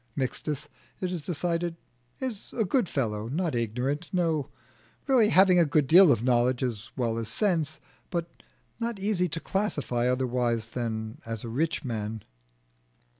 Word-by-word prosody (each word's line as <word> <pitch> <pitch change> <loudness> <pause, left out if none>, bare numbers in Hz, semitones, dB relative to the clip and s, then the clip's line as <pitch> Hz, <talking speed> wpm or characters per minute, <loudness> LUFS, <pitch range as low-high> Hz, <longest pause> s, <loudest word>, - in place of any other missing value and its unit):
Mixtus, 150 +2 -2 0.3
it 185 -1 -2
is 175 -3 -3
decided, 170 +1 -1 0.4
is 250 -6 -5
a 225 - +2
good 225 - +1
fellow, 110 -5 -1
not 165 +5 -1
ignorant 125 +7 -1
no, 165 -6 0 0.6
really 250 -6 +4
having 185 -3 +6
a - - +7
good 150 -1 +2
deal 175 +3 +8
of 115 -3 +2
knowledge 125 0 +2
as 115 -4 -3
well 115 -3 0
as 115 - -4
sense, 160 - 0 0.3
but 170 -2 -4 0.4
not 230 -2 -2
easy 190 -2 +1
to 165 - -3
classify 145 - -1
otherwise 120 -3 0
than 115 +2 -4
as 115 -1 -5
a 115 - -5
rich 155 +6 -1
man. 110 -3 -3
145 Hz, 150 wpm, -28 LUFS, 120-180 Hz, 0.6 s, deal